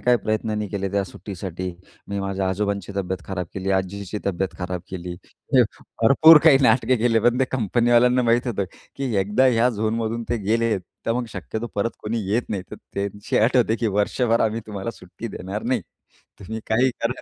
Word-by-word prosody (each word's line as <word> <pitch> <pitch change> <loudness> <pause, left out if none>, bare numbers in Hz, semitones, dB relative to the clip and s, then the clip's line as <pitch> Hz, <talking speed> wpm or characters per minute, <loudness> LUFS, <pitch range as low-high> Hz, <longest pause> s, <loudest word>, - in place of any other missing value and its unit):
काय 125 0 +4
प्रयत्नांनी 110 -1 -2
केले 100 0 -2
त्या 100 0 +1
सुट्टीसाठी. 95 -1 -6 0.4
मी 100 - -3
माझ्या 95 -1 -1
आजोबांची 100 0 -2
तब्येत 95 -2 -3
खराब 90 -2 -3
केली, 95 0 -2
आजीची 95 +2 -2
तब्येत 95 0 0
खराब 90 0 -3
केली, 90 -1 -5 0.9
भरपूर 155 +7 +8
काही 150 -5 +8
नाटके 125 +2 +4
केले. 115 -1 +2
पण 120 +2 +3
ते - - +5
कंपनीवाल्यांना 120 +1 +3
माहीत 120 +1 +2
होतं 105 -5 -1 0.3
की 135 -3 -2
एकदा 105 +7 +2
ह्या 120 -1 +4
झोनमधून 115 +1 -1
ते 120 - +1
गेले, 115 +1 +2 0.3
तर 115 - +2
मग 125 +1 -1
शक्यतो 110 +2 -5
परत 105 +3 0
कोणी 115 +2 -2
येत 115 +4 +2
नाही. 100 -3 -2
तर - - -7 0.2
त्यांची 100 +1 -2
अट 115 +4 +3
होती, 115 -2 +3
की 115 +1 -1
वर्षभर 115 +3 +2
आम्ही 110 +1 +1
तुम्हाला 105 0 -4
सुट्टी 110 +2 -9
देणार 95 +3 -5
नाही, 125 -1 0 0.6
तुम्ही 110 +3 -6
काही 125 +4 +3
करा. 125 +2 -1
110 Hz, 180 wpm, -23 LUFS, 100-120 Hz, 0.9 s, भरपूर